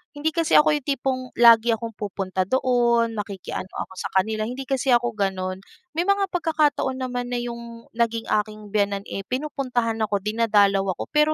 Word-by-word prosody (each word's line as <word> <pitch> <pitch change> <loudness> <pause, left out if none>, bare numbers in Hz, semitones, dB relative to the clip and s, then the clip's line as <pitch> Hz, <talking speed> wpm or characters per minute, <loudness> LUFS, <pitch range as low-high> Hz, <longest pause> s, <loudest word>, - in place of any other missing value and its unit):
hindi 295 +2 0
kasi 330 0 0
ako 310 +1 +6
yung 285 - -10
tipong 270 -2 -1
lagi 230 -1 +6
akong 230 +1 -4
pupunta 190 -2 -2
doon, 235 -1 +2
makiki-ano 200 -3 -5
ako 190 - -6
sa - - -4
kanila. 215 +3 +1
Hindi 250 +3 -5
kasi 270 -1 +1
ako 240 0 +3
gano'n. 185 -2 -1 0.4
May 345 - +1
mga 400 -1 +2
pagkakataon 305 -6 0
naman 245 -1 -3
na 240 - -1
yung 235 -1 -8
naging 230 -1 0
aking 210 0 -1
biyenan, 200 -1 0
eh, 195 - -4
pinupuntahan 255 -4 -2
ako, 200 -1 -1
dinadalaw 205 -2 +2
ako. - - -6
Pero 300 0 +3
235 Hz, 170 wpm, -23 LUFS, 210-265 Hz, 0.4 s, ako